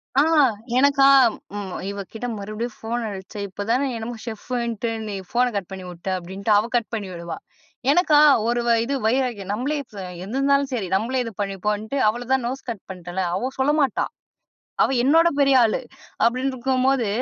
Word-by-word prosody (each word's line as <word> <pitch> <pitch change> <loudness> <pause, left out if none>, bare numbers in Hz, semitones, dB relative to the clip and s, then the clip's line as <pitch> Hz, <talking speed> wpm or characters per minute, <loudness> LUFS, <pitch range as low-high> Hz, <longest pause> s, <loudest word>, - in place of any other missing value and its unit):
ஆ. 280 - +6 0.6
எனக்கா 280 0 +5 0.5
ம் 195 -3 -5 0.2
இவ 200 0 -5
கிட்ட 245 +2 -4
மறுபடியும் 215 +3 -5
ஃபோன் 235 +2 -3
அடிச்சே 195 +1 -8
"இப்பதான 230 +8 -1
என்னமோ 230 +1 -5
ஷெஃபுன்ட்டு 235 0 -3 0.2
நீ 205 - -4
ஃபோன 245 +2 +2
கட் 195 -2 -3
பண்ணி 190 -1 -7
உட்ட" 170 +3 -13
அப்டின்ட்டு 190 +4 -4
அவ 215 +3 +1
கட் 235 -2 +1
பண்ணி 205 -3 -3
விடுவா. 170 0 -6 0.5
எனக்கா, 305 -2 +4 0.3
ஒரு 240 0 +1
வ - - +3
இது. 275 +4 -2
வைராக்கியம் 230 -6 0
நம்பளே 265 +7 -1 0.2
ச - - -10 0.3
என்னானாலும் 275 +4 +1
சரி, 205 -7 -2
நம்மளே 245 +6 0
இது 230 - -6
பண்ணிப்போம்ன்ட்டு, 210 +5 -2
அவள 240 +3 0
தான் 265 -2 +3
நோஸ் 265 +2 -5
கட் 220 -5 -5
பண்ட்டேன்ல! 180 0 -5
அவ 250 +8 -1
சொல்ல 275 +3 +3
மாட்டா. 265 -6 +1 0.8
அவ - - +2
என்னோட 325 +6 +5
பெரிய 275 -1 +5
ஆளு. 220 - +2 0.5
அப்டின்னு 255 +3 +1
இருக்கும்போது. 260 -1 +1
235 Hz, 165 wpm, -23 LUFS, 200-265 Hz, 0.8 s, ஆ